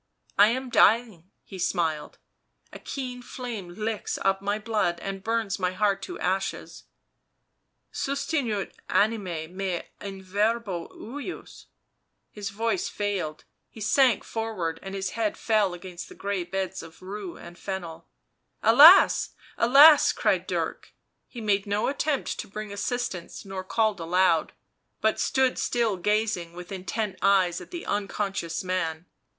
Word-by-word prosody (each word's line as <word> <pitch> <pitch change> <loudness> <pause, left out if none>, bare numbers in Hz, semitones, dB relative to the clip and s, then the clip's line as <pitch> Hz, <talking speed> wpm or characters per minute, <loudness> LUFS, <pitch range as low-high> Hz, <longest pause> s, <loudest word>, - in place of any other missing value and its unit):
" - - -35
I 205 - +9
am 255 +2 -2
dying," 215 -7 +3
he 190 - -10
smiled. 165 -4 -1 0.3
" - - -39
A - - -8
keen 250 -2 -5
flame 240 -7 -6
licks 215 0 -3
up 195 0 +2
my 205 +1 0
blood 215 -6 0
and 195 +2 -5
burns 225 -3 -1
my 180 -1 0
heart 200 0 +1
to - - -6
ashes 190 +2 -3 0.4
— - - -50
' - - -50
Sustinuit 275 -7 -1 0.2
anima 195 -7 0
mea 185 -1 -3 0.2
in 195 -1 -7
verbo 205 -2 -1
ejus.; 285 - -8 0.3
" - - -50 0.3
His 205 -1 -5
voice 230 - -1
failed, 195 -7 -3 0.2
he - - -13
sank 240 +1 +3
forward 195 -8 -3
and 195 0 -7
his 190 -1 -2
head 220 -2 -1
fell 210 -5 +1
against 180 -1 -9
the - - -12
grey 200 -3 -2
beds 190 +1 -3
of 165 +2 -14
rue 195 -1 -6
and 170 0 -11
fennel. 170 -4 -6 0.3
" - - -46
Alas! 295 - +8 0.2
alas!" 285 +5 +7
cried - - +1
Dirk; - - -3 0.3
he 240 - -9
made 205 -2 +1
no 205 +1 0
attempt 285 0 -1
to - - -5
bring 210 0 -6
assistance 205 -5 -4
nor 190 -1 -5
called 215 0 +1
aloud, 170 -1 +2 0.5
but - - +1
stood 265 -2 +1
still, 230 -4 +1
gazing 205 -3 0
with 180 +1 -10
intent 195 +2 -3
eyes 190 -3 +3
at - - -11
the 345 -1 -7
unconscious 195 -4 -2
man. 170 -3 -2
200 Hz, 150 wpm, -26 LUFS, 185-225 Hz, 0.5 s, I